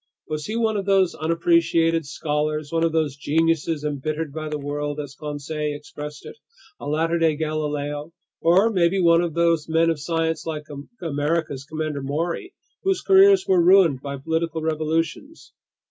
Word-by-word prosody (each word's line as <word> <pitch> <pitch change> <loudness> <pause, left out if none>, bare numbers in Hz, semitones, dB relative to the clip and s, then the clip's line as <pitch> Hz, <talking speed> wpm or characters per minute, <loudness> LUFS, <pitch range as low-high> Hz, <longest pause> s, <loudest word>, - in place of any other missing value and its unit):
Was 155 -1 -4
he 215 - -3
one 225 -2 +1
of 195 -1 -4
those 195 -2 +3
unappreciated 165 -1 +2
scholars, 150 0 -2
one 165 0 +1
of 165 - +2
those 155 -4 0
geniuses 160 +1 0
"embittered 150 +1 -3
by 155 0 -5
the 150 - -2
world," 145 +1 -4
as 145 -2 -6
Conseil 150 0 -4
expressed 150 0 -9
it, - - -9 0.4
a - - -7
latter 165 +3 0
day 160 -2 +3
Galileo, 150 -1 -3 0.3
or 190 +7 +4
maybe 185 -1 +2
one 170 -1 +5
of 170 -3 -3
those 170 -2 +2
men 165 +1 +3
of 160 - -3
science, 165 0 -1
like 155 -2 -4 0.4
America's 145 -2 -1
Commander 155 -1 -4
Maury, 165 - -3 0.3
whose 385 -1 0
careers 390 0 +6
were 185 -2 +4
ruined 175 -7 +5
by 140 -1 -5
political 160 +3 -2
revolutions? 160 - -2
160 Hz, 160 wpm, -23 LUFS, 150-170 Hz, 0.4 s, careers